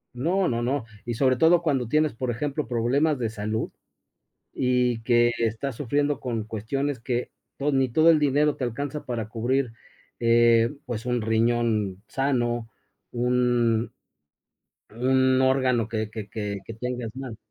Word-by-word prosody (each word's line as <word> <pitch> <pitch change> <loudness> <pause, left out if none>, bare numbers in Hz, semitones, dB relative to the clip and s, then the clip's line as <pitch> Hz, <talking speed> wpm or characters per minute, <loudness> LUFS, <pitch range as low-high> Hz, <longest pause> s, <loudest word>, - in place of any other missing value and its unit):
No, 180 +9 +1
no, 120 -1 -1
no, 130 +1 -1 0.2
y 120 - -2
sobre 130 +1 +2
todo 165 +4 +5
cuando 135 -7 0
tienes, 155 +3 +2
por 125 +1 -2
ejemplo, 145 +5 -3
problemas 130 +6 +1
de 115 -3 -1
salud 110 +1 -3 0.8
y 125 -2 +1
que 120 0 +4
estás 115 +3 -2
sufriendo 145 +2 0
con 115 -4 -3
cuestiones 125 +5 -3
que 120 0 -2 0.3
to 145 +1 0
ni 135 -1 +2
todo 160 +7 +5
el 160 - +5
dinero 150 +1 +2
te 130 - -3
alcanza 140 +5 -4
para 115 -4 -4
cubrir, 125 +1 0 0.5
eh, 115 0 +4
pues, 120 -2 -5
un 125 -2 0
riñón 110 -3 +1
sano, 120 -2 -1 0.4
un 120 -2 +1 1.0
un 130 +2 +2
órgano 130 -4 +2
que 110 -2 -3
que 105 -2 -6 0.4
que 115 - -8
tengas 125 -2 -4
mal. 130 -5 -7
125 Hz, 145 wpm, -25 LUFS, 115-135 Hz, 1.0 s, todo